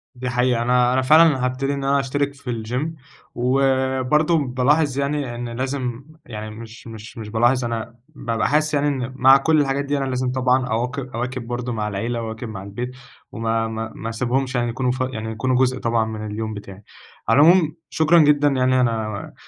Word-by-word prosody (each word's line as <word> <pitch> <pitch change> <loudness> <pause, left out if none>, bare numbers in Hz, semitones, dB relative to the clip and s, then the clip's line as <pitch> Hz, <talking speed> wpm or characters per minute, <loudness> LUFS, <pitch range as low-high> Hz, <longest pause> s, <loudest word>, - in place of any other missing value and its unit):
دي 125 0 -4
حقيقة، 125 -1 +1
أنا 125 +1 +3
أنا 130 - +2
فعلًا 150 -1 +5
هابتدي 135 +2 -1
إن 140 -1 -4
أنا 140 +1 +2
أشترك 140 +1 -1
في 125 -5 -5
الgym 140 +7 -4 0.3
وبرضه 130 +4 +2
بالاحظ 140 +2 +1
يعني 140 -3 -2
إن 120 0 -5
لازم 130 0 -4 0.2
يعني 110 -2 -7
مش 115 +2 -11
مش 110 +1 -10
مش 110 -1 -7
بالاحظ 120 +3 +2
أنا 115 0 -4
بابقى 115 -7 -2
حاسس 155 +1 +1
يعني 145 0 +2
إن 130 -2 -2
مع 135 +1 +7
كلّ 155 +2 +3
الحاجات 140 0 -1
دي 145 0 -1
أنا 135 - -1
لازم 125 0 -1
طبعًا 130 0 +1
أواك 125 +4 -2
أواكب 125 -1 -5
برضه 120 0 -3
مع 105 -1 -2
العيلة، 115 +4 -3
أواكب 110 0 -6
مع 95 -3 -7
البيت 120 +6 -5 0.4
وما 115 0 -1
ما 110 0 -5
ما 115 - -5
أسيبهمش 125 +3 -1
يعني 120 -1 0
يكونوا 125 +1 -1
ف 130 - -4
يعني 110 0 -4
يكونوا 130 +3 -1
جزء 130 0 +2
طبعًا 115 -1 +1
من 110 -1 -5
اليوم 110 +1 -4
بتاعي. 100 -1 -10 0.5
على - - +5
العموم 165 -1 +5
شكرًا 160 +2 +4
جدًا 145 -1 +4
يعني، 130 -2 +2
أنا 110 -4 -2
125 Hz, 190 wpm, -21 LUFS, 115-135 Hz, 0.5 s, مع